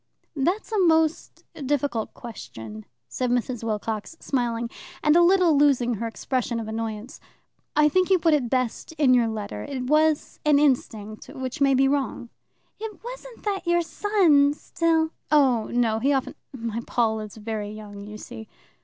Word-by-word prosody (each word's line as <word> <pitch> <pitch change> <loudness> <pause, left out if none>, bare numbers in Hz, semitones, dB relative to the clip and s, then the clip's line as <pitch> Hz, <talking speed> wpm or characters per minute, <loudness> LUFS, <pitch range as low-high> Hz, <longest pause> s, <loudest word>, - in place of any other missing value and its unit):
"That's 350 +12 -1
a 430 - +1
most 320 -3 +2 0.2
difficult 275 -5 -1
question," 110 - -9 0.2
said 250 -1 -2
Mrs. 245 -1 -1
Wilcox, 220 +5 -3
smiling, 235 -3 -1 0.4
and 300 0 +4
a 345 - +7
little 350 -2 +5
losing 275 -4 +3
her 230 +1 -3
expression 235 0 -2
of 225 - -5
annoyance. 220 +3 -5 0.6
"I 300 0 +5
think 370 +4 +2
you 380 - +5
put 325 -2 +3
it 265 -6 +1
best 255 +4 -1
in 290 -5 +4
your 240 -2 +4
letter 215 -2 -5
it 270 -3 -4
was 305 +3 +2
an 300 -1 +4
instinct, 220 -7 0
which 265 -1 -6
may 275 -1 +5
be 270 +1 +4
wrong." 270 -3 -1 0.5
"It 440 -1 -7
wasn't - - -9
that 390 -4 -2
your 345 0 +3
son 325 -7 +3
still 320 0 0
" - - -39
"Oh 260 -7 +4
no; 230 -2 +1
he 270 +5 +2
often 265 -2 -1 0.2
my 230 -3 -4
Paul 220 -2 +1
is 215 0 -8
very 215 -1 -4
young, 210 -1 -9
you 210 +1 -8
see." 110 - -9
260 Hz, 165 wpm, -25 LUFS, 225-310 Hz, 0.6 s, a